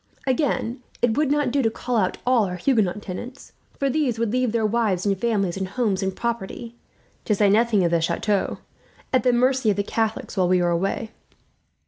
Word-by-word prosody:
Again, 255 -2 0 0.2
it 230 -2 +3
would 300 -2 +1
not 290 -3 +1
do 280 +2 +2
to 225 - +2
call 245 +2 -4
out 190 -5 +1
all 245 -4 +3
our 180 -1 -4
Huguenot 210 -1 +1
tenants; 240 +8 -8 0.3
for 275 - 0
this 270 -4 0
would 230 -2 -1
leave 250 -1 +1
their 225 -1 +1
wives 215 -4 0
and 200 -1 +2
families 195 -3 0
and 190 -1 -2
homes 200 -1 -1
and 190 -1 -2
property, 235 0 -4 0.5
to 210 - +1
say 200 -1 +3
nothing 220 -2 +3
of 170 - +1
the 170 -1 +2
chateau, 200 +4 0 0.6
at 255 - +4
the 250 - +3
mercy 255 0 +2
of 205 - +2
the 200 - +1
Catholics 220 +1 -2
while 185 -3 +2
they 180 0 +3
were 175 -1 +1
away. 195 +6 -1
225 Hz, 200 wpm, -23 LUFS, 195-245 Hz, 0.6 s, at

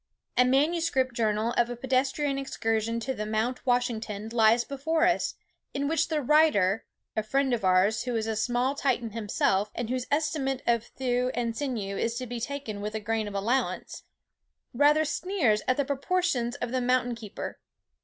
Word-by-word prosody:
A 250 - +6
manuscript 270 -1 +2
journal 220 0 0
of 240 0 +3
a 245 - -4
pedestrian 265 +3 0
excursion 225 -3 -1
to 245 -3 -3
Mount 220 +4 -1
Washington 225 -4 -1
lies 230 +1 +4
before 320 +5 0
us, 350 -1 +1 0.4
in 280 0 0
which 320 0 +1
the 310 -3 -1
writer 240 -9 +3 0.3
(a 220 - +1
friend 270 +4 +1
of 230 - -1
ours, 185 +5 +3
who 245 -2 -2
is 220 -1 0
a 225 -1 -2
small 245 +4 +1
Titan 245 -5 -1
himself, 205 -2 0
and 240 0 -3
whose 255 -1 -2
estimate 290 -3 0
of 235 -2 +2
thewe 250 -1 +1
and 235 -1 -1
sinew 225 -9 -3
is 230 0 -1
to 255 +1 -3
be 240 0 -5
taken 235 -5 -5
with 210 +1 -4
a - - -1
grain 220 0 -1
of 205 - -7
allowance) 235 +7 -1 0.7
rather 295 +4 +4
sneers 295 - +1
at 255 - +2
the 285 - +1
proportions 280 -3 0
of 245 - -4
the 255 0 0
mountain 250 0 +1
keeper. 225 -3 -7
245 Hz, 175 wpm, -28 LUFS, 220-275 Hz, 0.7 s, A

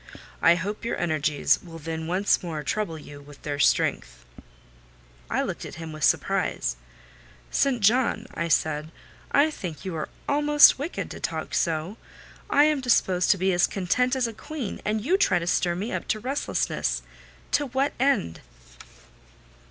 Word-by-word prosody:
I 170 - +6
hope 200 +5 -4
your 235 - -2
energies 155 -3 +1
will 165 -2 -10
then 160 0 -5
once 185 +4 +2
more 160 -4 -5
trouble 165 +3 -2
you 145 -1 -11
with 145 0 -15
their 145 -1 -3
strength." - - +1 1.0
I - - 0
looked - - -5
at - - -8
him 160 -1 -7
with 155 -1 -7
surprise. - - +1 0.8
"St. 260 -4 +1
John," 235 +5 +2
I 170 - -2
said, 155 0 0 0.4
"I 295 +3 +4
think 180 - -7
you 185 -3 -4
are 155 - -4 0.2
almost 295 -1 +6
wicked 305 +5 -4
to - - -7
talk - - -4
so. 165 +4 -1 0.5
I 290 - +5
am 300 -2 +2
disposed 190 -8 +2
to 200 - +5
be 190 +1 +1
as 175 +1 +3
content 250 +7 0
as 260 -2 +1
a 230 - -4
queen, 270 -1 -6
and 215 +1 0
you 365 +6 +3
try 395 - +3
to 170 - -2
stir 175 0 +1
me 205 +7 -4
up - - -4
to 215 - 0
restlessness! 205 - -1 0.5
To 290 - +1
what 265 +3 0
end?" 260 - +1
185 Hz, 165 wpm, -25 LUFS, 160-250 Hz, 1.0 s, I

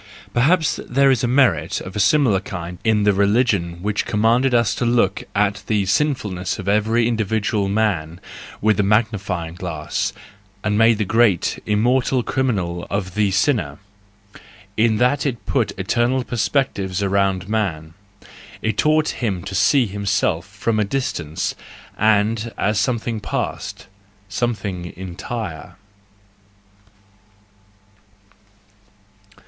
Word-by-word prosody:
—Perhaps 155 +6 +2
there 135 +2 +4
is 130 -1 +1
merit 120 - +2
of 90 - -9
a - - -2
similar 130 - +3
kind 90 -2 -7
in 110 -2 +2
the 105 0 +4
religion 100 -4 +1
which 105 0 0
commanded 115 +5 +2
us 120 -3 +3
to - - -3
look 115 -5 +1
at 100 0 +1
the 105 -3 +1
sinfulness 100 - -1
of 95 - -7
every 110 +3 +2
individual 110 -3 0
man 95 -6 -1 0.4
with 105 -1 +2
a - - +6
magnify¬ 100 -4 0
ing - - -11
glass, 85 -4 -3 0.5
and 105 - 0
to - - +1
make 115 -1 +4
a 105 - +1
great, 110 -4 +2
immortal 125 +4 +2
criminal 95 -12 -1
out - - -18
of 95 -3 -2
the 105 -1 +2
sinner; 105 +5 0 1.0
in 110 0 +2
that 125 +5 +2
it 130 -5 -3
put - - 0
eternal 125 +2 +1
per¬ 120 - -6
spectives 100 -8 0
around 95 -2 +1
man, 90 -8 -2 0.7
it 110 -2 -1
taught 155 +3 +3
him 100 -8 -2
to - - -6
see 100 +7 +3
himself 100 -4 -1
from 110 +2 -2
a - - +3
distance, 100 - -2 0.4
and 110 +2 +1
as 105 +1 +1
something 115 -1 -1
past, - - -4 0.4
something 100 -6 -3
entire. 95 -1 -6
105 Hz, 130 wpm, -20 LUFS, 95-120 Hz, 1.0 s, a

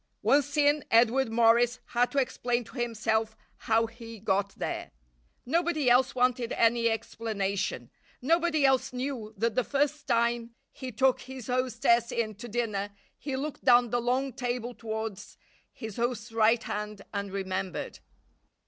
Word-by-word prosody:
Once 285 +1 +2
in, 290 0 +3
Edward 235 +2 +4
Morris 235 +1 +4
had 245 +1 +2
to 285 - -6
explain 245 -2 0
to 230 - -16
himself 220 -1 -1 0.3
how 225 +1 +4
he 230 -1 -10
got 200 -1 0
there. - - -4 0.6
Nobody 310 -2 +1
else 255 +2 +4
wanted 250 -1 +1
any 230 0 +3
explanation. 215 -3 -3 0.3
Nobody 325 +1 +2
else 265 0 +3
knew 250 -4 -4
that 230 +2 0
the 255 - +1
first 290 +2 -1
time 235 -1 0 0.2
he 260 -1 -7
took 260 +3 +2
his 260 -2 -9
hostess 245 -1 +1
in 220 -2 -1
to 225 +4 -9
dinner 210 -3 -2 0.3
he 275 -2 -5
looked 285 +2 -5
down 245 -2 +5
the 245 - +1
long 255 +2 0
table 245 0 -3
towards 220 -2 -6 0.3
his 220 -3 -8
host's 240 -1 -2
right 225 +1 +3
hand 210 -1 -5
and 200 -1 -3
remembered. 190 -1 -4
240 Hz, 145 wpm, -28 LUFS, 225-260 Hz, 0.6 s, down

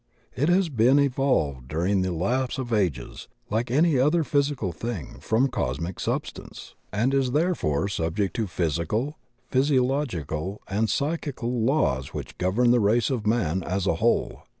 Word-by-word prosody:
It 145 +6 +1
has 180 -1 +3
been 125 +1 +4
evolved 130 - +1
during 90 +7 0
the 95 0 -1
lapse 120 +11 -1
of 125 -3 -3
ages, 90 - -1 0.2
like 115 +3 0
any 150 +2 +3
other 155 +5 +3
physi 145 -1 +1
cal 95 -4 -2
thing, 85 - -6
from 110 - +2
cosmic 85 - -3
substance, - - -5 0.2
and 115 +6 +1
is 135 -2 +1
therefore 145 - +1
subject 95 +1 -2
to 110 -3 0
physical, 85 - -2 0.3
physiological, 125 - 0
and 105 +3 0
psychical 140 -6 -2
laws 110 - +1
which - - -7
govern 110 +7 +2
the 120 - +4
race 115 +5 +2
of 115 -5 -2
man 95 -6 +1
as 95 +2 -2
a 85 - +1
whole. 115 +1 +1
115 Hz, 150 wpm, -25 LUFS, 90-135 Hz, 0.3 s, been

